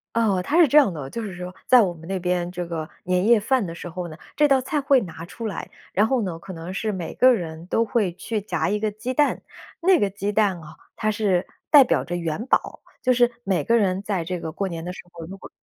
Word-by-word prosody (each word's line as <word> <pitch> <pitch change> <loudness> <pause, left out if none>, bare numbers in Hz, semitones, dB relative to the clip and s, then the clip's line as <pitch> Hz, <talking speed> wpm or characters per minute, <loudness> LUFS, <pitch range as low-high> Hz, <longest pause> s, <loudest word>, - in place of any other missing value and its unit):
哦， 205 -5 +2
它 300 - 0
是 330 - +7
这 295 - +4
样 275 -10 +6
的， 145 -5 -6
就 230 - -5
是 195 -5 -6
说， 180 0 -7
在 250 -2 +7
我 180 -4 +1
们 165 0 -13
那 190 -1 -2
边 180 0 -1
这 180 -1 -4
个 160 -2 -5
年 180 +1 +1
夜 235 -2 +6
饭 240 0 +1
的 165 - -6
时 175 - -8
候 175 +1 -5
呢， 155 0 -10 0.2
这 300 - +4
道 275 -2 +4
菜 285 +3 -2
会 275 -1 +4
拿 165 -2 -8
出 225 +6 -8
来， 210 - -5 0.2
然 210 +3 +3
后 255 -2 +1
呢， 170 -3 -4
可 190 - -10
能 170 +2 -7
是 215 +2 -2
每 180 -4 -5
个 255 0 +6
人 170 -5 -3
都 230 +4 +1
会 210 -6 0
去 210 +3 -3
夹 175 -5 -1
1 210 +1 0
个 215 0 0
鸡 240 +5 -4
蛋。 290 +2 +1 0.4
那 370 +1 +5
个 205 - +1
鸡 200 +1 -3
蛋 200 -4 +1
哦， 155 0 -12 0.2
它 215 0 0
是 200 -4 0 0.2
代 290 -3 +9
表 - - +1
着 175 - -4
元 170 +4 -3
宝， - - 0 0.2
就 255 -1 +4
是 240 0 +3
每 190 -2 0
个 235 0 +3
人 190 -2 +1
在 200 -5 -2
这 180 +1 -4
个 160 - -5
过 195 +4 -2
年 165 -2 -5
的 180 - -4
时 - - -11
候， 165 -1 -9
如 195 +1 -9
果 - - -12
195 Hz, 280 characters per minute, -23 LUFS, 175-230 Hz, 0.4 s, 代